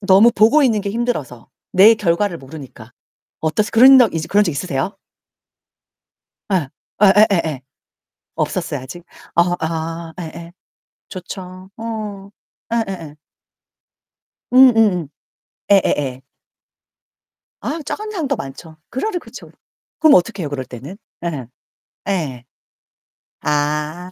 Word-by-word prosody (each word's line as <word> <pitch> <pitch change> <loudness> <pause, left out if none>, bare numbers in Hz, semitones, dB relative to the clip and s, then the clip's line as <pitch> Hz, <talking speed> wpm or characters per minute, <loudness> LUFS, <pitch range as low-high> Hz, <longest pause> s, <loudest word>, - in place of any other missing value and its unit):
너무 200 +4 +6
보고 270 +8 +5
있는 220 -5 +2
게 200 0 -3
힘들어서 200 - -3 0.2
내 205 +5 +7
결과를 185 -2 0
모르니까 135 -5 -11 0.5
어떠세요? 185 +7 0
그런 260 +4 +8
적 235 -5 +5 0.2
그런 205 +1 +4
적 - - 0
있으세요? 155 +3 -3 1.6
예. 155 -8 0 0.3
예예예예. 190 -8 +4 0.7
없었어요, - - -2
아직? 165 +7 -10 0.3
어 170 - +6 0.2
아. 165 +1 -4
예예. 170 0 -8 0.6
좋죠. 185 0 -9
어, 215 -3 -6 0.4
예예예. 190 -10 -3 1.4
음음음. 225 - +5 0.6
예예예. 140 -9 +2 1.4
아, 320 - -3
짜증나는 430 0 -4
상황도 305 -9 -1
많죠. 155 0 -9
그러려 355 - -2
그쵸. - - -12 0.5
그럼 310 -2 +6
어떡해요 180 -4 +1
그럴 140 -2 -4
때는? 130 +11 -10 0.3
예. 145 -8 -4 0.6
예. 145 -11 -2 1.0
아. 150 +4 -2
185 Hz, 220 characters per minute, -19 LUFS, 155-215 Hz, 1.6 s, 그런